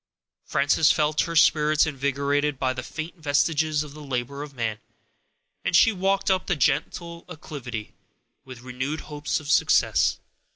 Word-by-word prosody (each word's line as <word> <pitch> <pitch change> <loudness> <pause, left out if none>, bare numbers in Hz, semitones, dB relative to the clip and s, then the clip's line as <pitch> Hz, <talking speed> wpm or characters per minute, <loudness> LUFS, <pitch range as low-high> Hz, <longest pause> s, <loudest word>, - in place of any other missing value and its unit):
Frances 145 +3 +3
felt 150 0 +1
her 165 - -3
spirits 155 -1 +4
invigorated 140 0 -1
by 130 -1 0
these 130 -1 -7
faint 160 +3 -7
vestiges 155 0 +1
of 145 -2 -11
the 150 - -11
labor 135 0 -4
of 145 -2 -9
man, 110 -3 -2 0.8
and - - 0
she 225 - +6
walked 195 0 0
up 185 -1 0
the 195 - +1
gentle 165 +4 -1
acclivity 130 -9 -7 0.5
with 130 -2 -11
renewed 130 +5 -4
hopes 150 0 -3
of 155 - -11
success. - - +3
150 Hz, 150 wpm, -25 LUFS, 135-155 Hz, 0.8 s, she